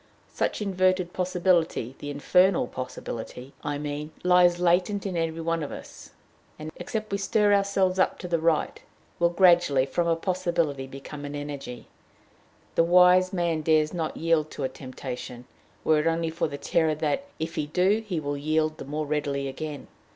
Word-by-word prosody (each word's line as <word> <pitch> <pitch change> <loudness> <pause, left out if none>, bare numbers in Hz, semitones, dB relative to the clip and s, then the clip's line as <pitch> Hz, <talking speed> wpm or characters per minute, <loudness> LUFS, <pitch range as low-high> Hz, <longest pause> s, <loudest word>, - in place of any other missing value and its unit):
Such - - -1
inverted 185 -2 +1
possibility, 175 -8 +1
the 145 - -6
infernal 180 +4 +3
possibility, 125 0 -7
I 145 -1 -2
mean, 145 +1 -4
lies 180 -1 +5
latent 180 +4 +2
in 190 -2 -3
every 165 -1 -2
one 165 0 -1
of 145 - -4
us, - - -10 0.5
and, 155 +1 -7
except 215 -2 -4
we 200 - -1
stir 205 +1 +2
ourselves 195 -2 +2
up - - +2
to 180 - -7
the 170 -1 0
right, 160 -1 0 0.4
will 170 0 +4
gradually, 170 -7 +4
from 170 +5 -1
a 165 - +3
possibility, 170 -6 -1
become 135 +2 -9
an 145 0 -5
energy. 145 -4 -6 0.9
The - - +4
wise 180 +1 +5
man 170 -3 0
dares 155 0 +2
not 165 -3 -3
yield 160 -2 +1
to 145 - -6
a 130 - 0
temptation, 125 -2 -8 0.4
were 155 -1 +3
it 150 - 0
only 165 0 0
for 165 - -1
the 140 - -6
terror 160 +1 +1
that, 155 - -1
if 165 +1 -4
he 150 - -2
do, 190 +7 +2
he 185 -7 -3
will 145 -1 -3
yield 155 +1 0
the - - -6
more 150 +2 -3
readily 140 -2 -1
again. 145 +1 -6
165 Hz, 175 wpm, -26 LUFS, 145-180 Hz, 0.9 s, lies